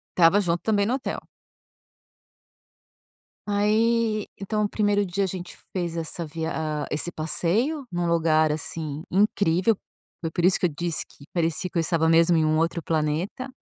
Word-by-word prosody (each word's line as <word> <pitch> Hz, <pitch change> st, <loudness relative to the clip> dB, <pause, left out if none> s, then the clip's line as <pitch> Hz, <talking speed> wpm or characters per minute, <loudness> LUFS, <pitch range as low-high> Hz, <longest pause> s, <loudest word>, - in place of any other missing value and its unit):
Tava 175 Hz, +3 st, +5 dB
junto 170 Hz, -2 st, 0 dB
também 205 Hz, -2 st, +2 dB
no 240 Hz, -, 0 dB
hotel. 270 Hz, -, -4 dB, 2.2 s
Aí 215 Hz, +1 st, +2 dB
então, 210 Hz, +2 st, -1 dB
o 205 Hz, -, 0 dB
primeiro 205 Hz, -1 st, +1 dB
dia 195 Hz, +2 st, -1 dB
a -, -, -2 dB
gente 180 Hz, -1 st, -7 dB, 0.2 s
fez 170 Hz, -3 st, -2 dB
essa 165 Hz, +1 st, -2 dB
via 160 Hz, +1 st, -4 dB
ah, 155 Hz, -1 st, -2 dB
esse 165 Hz, +3 st, 0 dB
passeio 210 Hz, -, 0 dB
num 175 Hz, 0 st, -1 dB
lugar, 160 Hz, -2 st, +3 dB
assim, 155 Hz, 0 st, -4 dB
incrível. 200 Hz, 0 st, +2 dB, 0.4 s
Foi 165 Hz, -2 st, -3 dB
por 175 Hz, -, 0 dB
isso 185 Hz, -, +5 dB
que -, -, 0 dB
eu -, -, +3 dB
disse 170 Hz, 0 st, -1 dB
que 140 Hz, -, -17 dB
parecia 170 Hz, +1 st, 0 dB
que 180 Hz, -, -5 dB
eu 165 Hz, -, +3 dB
estava 160 Hz, 0 st, +1 dB
mesmo 165 Hz, +1 st, +5 dB
em 155 Hz, -, +3 dB
um 155 Hz, 0 st, +2 dB
outro 165 Hz, +1 st, 0 dB
planeta. 165 Hz, -, -2 dB
175 Hz, 165 wpm, -25 LUFS, 160-205 Hz, 2.2 s, Tava